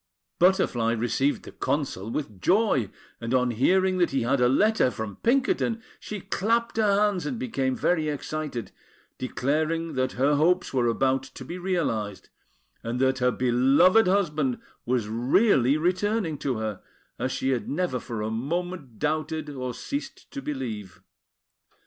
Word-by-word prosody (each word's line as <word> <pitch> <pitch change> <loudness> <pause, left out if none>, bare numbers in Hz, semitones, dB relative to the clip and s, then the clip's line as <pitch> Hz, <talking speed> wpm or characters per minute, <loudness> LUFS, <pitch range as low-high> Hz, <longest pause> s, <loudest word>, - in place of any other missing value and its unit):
Butterfly 125 -11 +3
received 120 +5 0
the - - -10
Consul 130 -8 -2
with 110 -8 -5
joy; 180 - +2 0.3
and 115 +2 -1
on 125 -1 +2
hearing 185 +10 +2
that 175 - +3
he 135 -3 0
had 130 +2 +1
a 125 - +5
letter 210 - +3
from 110 -5 -6
Pinkerton, 235 -2 +1 0.2
she 210 -2 -6
clapped 230 +5 0
her 205 -2 +3
hands 205 -4 0
and 255 - -3
became 135 - -1
very 160 0 +1
excited, 150 -4 -4 0.5
declaring 155 +6 -1
that 130 0 0
her 140 +3 +2
hopes 180 +3 +2
were 125 -2 +2
about 130 +3 +2
to 130 0 -11
be 175 +7 -6
realised, 140 - -2 0.5
and 115 +2 -3
that 130 0 +2
her 125 0 +3
beloved 135 - +4
husband 150 -9 +1 0.3
was 120 -3 +1
really 130 - +3
returning 180 -1 0
to 130 -5 -1
her, 110 -3 -4 0.4
as 130 +2 -1
she 130 - -1
had 125 -3 -2
never 150 -4 -1
for 115 -3 -5
a 110 - -2
moment 145 +1 -3
doubted, 155 0 -2
or 130 -2 -4
ceased 280 - -6
to 275 - -5
believe. 115 - -5
140 Hz, 150 wpm, -26 LUFS, 125-180 Hz, 0.5 s, a